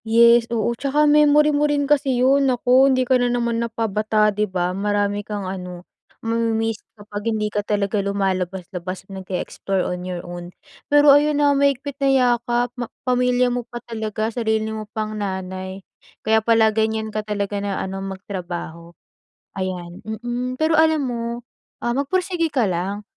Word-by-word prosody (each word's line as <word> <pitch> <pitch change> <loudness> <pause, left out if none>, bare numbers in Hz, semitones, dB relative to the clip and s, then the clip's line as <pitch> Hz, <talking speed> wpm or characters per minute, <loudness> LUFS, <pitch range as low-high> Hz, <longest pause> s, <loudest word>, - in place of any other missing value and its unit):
Yes, 235 +1 +5
oo. 235 0 0
Tsaka 280 +5 +1
memory 300 0 +5
mo 295 +1 +2
rin 290 -1 +1
kasi 275 -3 +2
'yon 270 +2 +4
naku 255 +2 +4
hindi 255 -1 +2
ka 255 0 +3
na 245 - +2
naman 235 -1 0
na 235 - -2
pabata 215 -1 +1
di 210 0 -1
ba? 180 -1 -1
Marami 205 +1 0
kang 205 -1 -5
ano 180 -1 -6 0.4
mamimiss 225 -1 0 0.2
kapag 205 +1 -5
hindi 210 -1 -1
ka 205 - +1
talaga 205 0 0
lumalabas-labas, 190 -2 -3
nag-eexplore 190 0 -3
on 180 0 -3
your 180 -1 -4
own. 175 0 -7 0.4
Pero 290 0 +6
ayon, 295 +1 +3
ha 285 -1 +4
mahigpit 280 0 0
na 275 - +3
yakap 245 -2 +2
ma 240 -2 -4 0.2
pamilya 250 -1 +2
mo 245 - -1
pa 240 - -6
talaga, 220 -1 -3
sarili 220 -2 -1
mo 215 -1 -6
pang 215 0 -4
nanay 190 -1 -5 0.4
kaya 220 0 +4
pala 220 -1 +3
ganyan 220 0 -1
ka 215 - -1
talaga 205 -1 -3
na 200 -1 -2
ano, 195 0 -4
magtrabaho 180 -4 -6 0.7
ayan. 180 -2 -5
Mm, 240 +3 -4
pero 315 +1 +3
alam 315 -1 +4
mo, 240 -2 -3 0.6
ah, 240 - 0
magpursige 335 +5 0
ka 250 -5 +2
lang, 190 +4 -3
220 Hz, 160 wpm, -21 LUFS, 195-250 Hz, 0.7 s, Pero